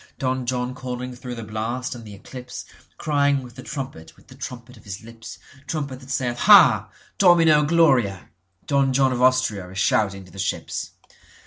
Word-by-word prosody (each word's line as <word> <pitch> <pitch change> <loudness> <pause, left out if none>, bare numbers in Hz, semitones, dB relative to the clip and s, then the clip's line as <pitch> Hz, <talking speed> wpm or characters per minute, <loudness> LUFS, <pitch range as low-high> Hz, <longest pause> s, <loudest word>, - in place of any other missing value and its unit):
Don 130 -1 -2
John 125 0 -1
calling 125 -1 -6
through 125 0 -7
the 115 - -7
blast 110 +4 -3
and 120 -2 -10
the 105 -2 -11
eclipseCrying 140 +4 -3
with 125 -1 -12
the 130 - -10
trumpet, 125 - -7
with - - -23
the - - -12
trumpet 125 -2 -8
of 110 - -18
his 100 +1 -8
lips, 115 -1 -11 0.3
Trumpet 140 -5 -4
that 130 0 -15
sayeth 125 -2 -2
ha! 140 - +7 0.3
Domino 165 -5 +6
gloria! 135 - +2 0.4
Don 140 -2 +2
John 135 0 +3
of 125 - -3
AustriaIs 115 -8 +1
shouting 95 0 +1
to 90 - -17
the 95 - -11
ships. 95 - -3
125 Hz, 165 wpm, -23 LUFS, 110-135 Hz, 0.4 s, ha